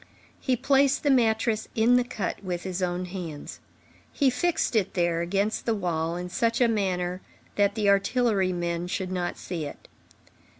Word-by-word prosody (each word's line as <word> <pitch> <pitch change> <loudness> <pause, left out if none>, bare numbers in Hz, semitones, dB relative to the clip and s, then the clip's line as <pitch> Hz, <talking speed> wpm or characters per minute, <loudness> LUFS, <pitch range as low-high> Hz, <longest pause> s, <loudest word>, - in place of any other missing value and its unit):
He 260 - +1
placed 275 +2 +3
the 290 - +3
mattress 220 -3 +2
in 230 +2 +4
the 250 - +4
cut 210 -4 -4
with 180 -2 -3
his 185 0 -4
own 180 0 -1
hands. 175 -5 -7 0.5
He 275 -3 +2
fixed 315 0 0
it 210 -4 +1
there 170 -2 +1
against 200 +7 -1
the 230 - +2
wall 170 -4 -1
in 180 0 -4
such 230 +5 0
a 245 - +5
manner 185 -4 -1 0.3
that 205 0 +2
the 215 -2 0
artillery 200 -1 +2
men 175 -1 -2
should 185 0 -3
not 180 -1 -2
see 170 -4 -4
it. 145 - -10
195 Hz, 170 wpm, -26 LUFS, 175-230 Hz, 0.5 s, a